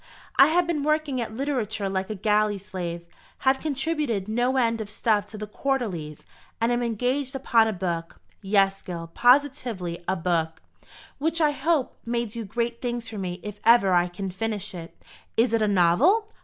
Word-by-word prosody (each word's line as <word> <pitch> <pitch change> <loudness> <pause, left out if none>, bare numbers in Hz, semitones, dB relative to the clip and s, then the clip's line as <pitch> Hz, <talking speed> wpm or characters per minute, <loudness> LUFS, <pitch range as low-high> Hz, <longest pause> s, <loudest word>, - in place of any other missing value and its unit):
I 275 - +8
have 345 +3 +3
been 330 -3 -1
working 305 -4 0
at 220 -1 -5
literature 230 -7 -1
like 190 0 -2
a 215 - -3
galley 210 +1 +2
slave; 175 -3 -6 0.4
have 265 0 +4
contributed 280 - -1
no 245 +4 +1
end 230 -3 +1
of 210 - -6
stuff 210 -1 +1
to 215 - -10
the 210 - -5
Quarterlies; 210 - -3 0.3
and 230 +1 +2
am 240 0 +1
engaged 250 +4 -1
upon 235 -4 +3
a - - 0
book, 175 -4 -4 0.2
yes 195 -1 +2
Gil, 165 -2 -7
positively 245 - +2
a 190 - +1
book, 165 -2 -1 0.6
which 320 +3 0
I 305 -2 +4
hope 290 -1 0
may 235 0 -1
do 230 +1 -6
great 235 +3 -3
things 240 -2 -3
for 215 -2 -6
me 180 -1 -4
if 210 -1 -7
ever 230 -5 +5
I 175 0 +4
can 185 +2 -5
finish 205 0 -3
it." 170 -2 -9 0.4
"Is 230 +1 +3
it 225 - +2
a 215 - +3
novel?" 210 - +4
225 Hz, 180 wpm, -25 LUFS, 190-260 Hz, 0.6 s, I